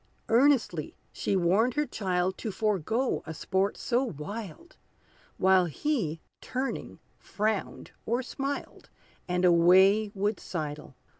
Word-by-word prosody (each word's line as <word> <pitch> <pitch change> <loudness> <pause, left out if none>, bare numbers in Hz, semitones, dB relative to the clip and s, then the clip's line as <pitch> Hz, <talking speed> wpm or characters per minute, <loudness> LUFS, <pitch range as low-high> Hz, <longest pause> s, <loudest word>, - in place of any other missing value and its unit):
Earnestly 235 - +2 0.2
she 200 - -1
warned 195 +8 +2
her 295 0 +1
child 185 -5 -1
To 220 - -3
forego 215 - 0
a 160 - -5
sport 190 +6 -1
so 245 +1 0
wild; 205 - -7 0.6
While 190 -1 +4
he, 170 - -2 0.2
turning, 260 +1 -4 0.2
frowned 215 0 -3 0.2
or 240 +3 0
smiled, 275 +2 -5 0.4
And 180 0 +1
away 190 +5 +5
would 205 +2 -1
sidle. 150 -5 -6
200 Hz, 115 wpm, -28 LUFS, 180-235 Hz, 0.6 s, away